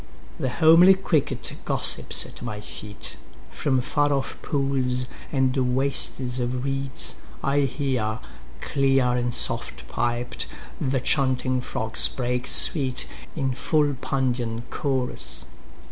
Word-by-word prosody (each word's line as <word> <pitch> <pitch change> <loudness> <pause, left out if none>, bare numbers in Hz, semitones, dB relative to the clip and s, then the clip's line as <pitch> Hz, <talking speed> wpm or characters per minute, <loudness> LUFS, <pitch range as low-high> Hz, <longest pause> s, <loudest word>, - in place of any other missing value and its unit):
10The 130 - -1
homely 165 +6 +6
cricket 165 -6 -1
gossips - - +3
at - - -10
my 105 -4 -5
feet.11From 105 +5 -4
far 145 +2 +1
off 135 -1 -2
pools 130 -3 0 0.3
and 130 -2 +1 0.2
wastes 130 -2 -1
of 125 +1 -2
reeds 135 -1 -1 0.3
I 140 +1 +2
hear,12Clear 125 - -1
and 120 0 -1
soft - - +1
piped, 120 0 -2 0.3
the 130 0 0
chanting 130 -1 +2
frogs 110 -3 0
break 125 -1 -2
sweet13In 135 -1 +2
full 145 +2 +1
Pandean 125 -4 -2
chorus. 130 -3 -1
130 Hz, 100 wpm, -24 LUFS, 125-140 Hz, 0.3 s, homely